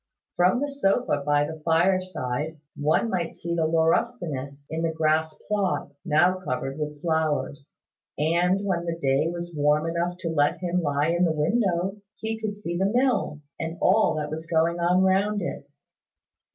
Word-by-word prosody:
From 180 +6 +3
the 290 - -1
sofa 245 - +1
by 145 0 +3
the 160 +1 -7
fire 175 +4 +3
side 155 -3 -4 0.2
one 155 +10 +1
might 175 -3 -2
see 170 0 -4
the 165 -2 +1
laurustinus 160 - 0
on 160 - -1
the 165 -1 0
grass 160 0 +1
plot, 200 -7 -1
now 175 +4 +3
covered 135 -3 -4
with 150 -1 -4
flowers: 155 -3 -1 0.4
and 175 +6 +2
when 175 -3 -1
the 165 0 -2
day 140 -1 +1
was 175 0 -5
warm 150 +1 +2
enough 170 +1 -1
to 165 - -2
let 145 -2 +2
him 180 0 -1
lie 145 0 +1
in 175 +1 +2
the 170 - +3
window, 185 +3 0 0.2
he 220 0 -4
could 210 -2 -2
see 175 -4 -5
the 195 +3 +1
mill, 245 - +1 0.2
and 165 +1 -4
all 190 -4 +3
that 150 -1 -3
was 160 +1 -5
going 165 +1 +1
on 180 +2 +3
round 200 +2 +2
it. 140 -5 -5
165 Hz, 170 wpm, -25 LUFS, 155-185 Hz, 0.4 s, From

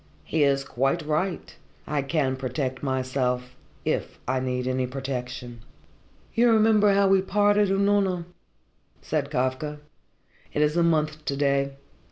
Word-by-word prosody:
He 160 - -1
is 140 -1 +3
quite 135 +5 0
right 170 +5 -2 0.3
I 150 -1 -1
can 135 -2 0
protect 130 0 -3
myself 130 -2 -1 0.3
if - - -2
I 130 +1 +1
need 125 -1 -2
any 130 0 0
protection." 125 -2 -5 0.7
"You 235 +1 +4
remember 215 -2 +5
how 200 0 +4
we 195 0 +4
parted, 205 +1 +3
Unorna?" 195 -2 +2 0.8
said - - -1
Kafka. 130 +4 -1 0.8
"It 150 - +2
is 150 +1 +1
a 175 - +3
month 155 -2 +1
to 140 - -2
day. 140 -1 +1
140 Hz, 135 wpm, -25 LUFS, 130-185 Hz, 0.8 s, remember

